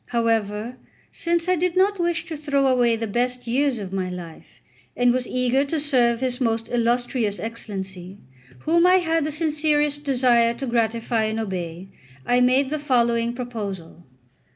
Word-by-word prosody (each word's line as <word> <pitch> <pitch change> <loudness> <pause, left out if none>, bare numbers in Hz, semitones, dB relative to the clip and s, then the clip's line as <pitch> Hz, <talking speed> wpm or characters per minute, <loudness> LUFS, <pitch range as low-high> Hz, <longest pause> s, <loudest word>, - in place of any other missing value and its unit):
However, 225 0 -1 0.3
since 340 0 -1
I 365 - +3
did 360 +1 -1
not 395 +1 +3
wish 345 -1 0
to 330 -2 -6
throw 285 -2 0
away 245 -3 +3
the 225 0 -3
best 245 +3 -2
years 260 +2 +1
of 195 -3 -7
my 185 -1 -2
life, 175 -3 -10 0.4
and 245 0 +4
was 255 -1 -1
eager 255 +2 +1
to 310 +3 -2
serve 245 -5 +2
his 255 0 -1
most 225 -2 0
illustrious 240 -2 0
Excellency, 195 -4 -6 0.4
whom 340 +2 +3
I 365 - +6
had 330 -4 +1
the 305 - -2
sincerest 300 -1 0
desire 245 -4 +3
to 270 - -5
gratify 230 -1 0
and 220 +1 -2
obey, 185 -3 -5 0.4
I 245 0 +3
made 260 +2 +3
the 305 - -1
following 235 -4 +1
proposal. 205 -9 -6
245 Hz, 160 wpm, -23 LUFS, 225-290 Hz, 0.4 s, I